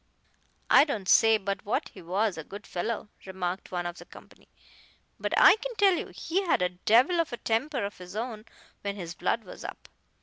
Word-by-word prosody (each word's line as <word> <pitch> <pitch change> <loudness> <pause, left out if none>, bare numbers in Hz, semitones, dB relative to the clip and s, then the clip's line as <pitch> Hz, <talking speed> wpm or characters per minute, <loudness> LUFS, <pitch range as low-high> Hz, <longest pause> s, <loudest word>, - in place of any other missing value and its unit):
"I - - +9
don't 220 -11 -3
say 225 +2 +6
but 200 -1 -4
what 215 +2 -1
he 190 - -13
was 190 +4 0
a 160 - -6
good 200 +6 -10
fellow," 210 +4 -3 0.2
remarked 185 0 -4
one 175 -1 -2
of 175 0 -5
the - - -11
company; - - -16 0.7
"but - - -2
I - - +8
can - - -6
tell 400 -2 +5
you - - -2
he 360 +4 -2
had 340 - +1
a 180 - +2
devil 235 - +3
of 330 - 0
a 240 - -4
temper 235 +1 -1
of 200 - -7
his 180 +1 -10
own 220 -1 -4 0.4
when 200 -1 -3
his 170 -4 -6
blood 230 +6 -1
was 185 - -11
up. - - -9
210 Hz, 205 wpm, -28 LUFS, 185-250 Hz, 0.7 s, I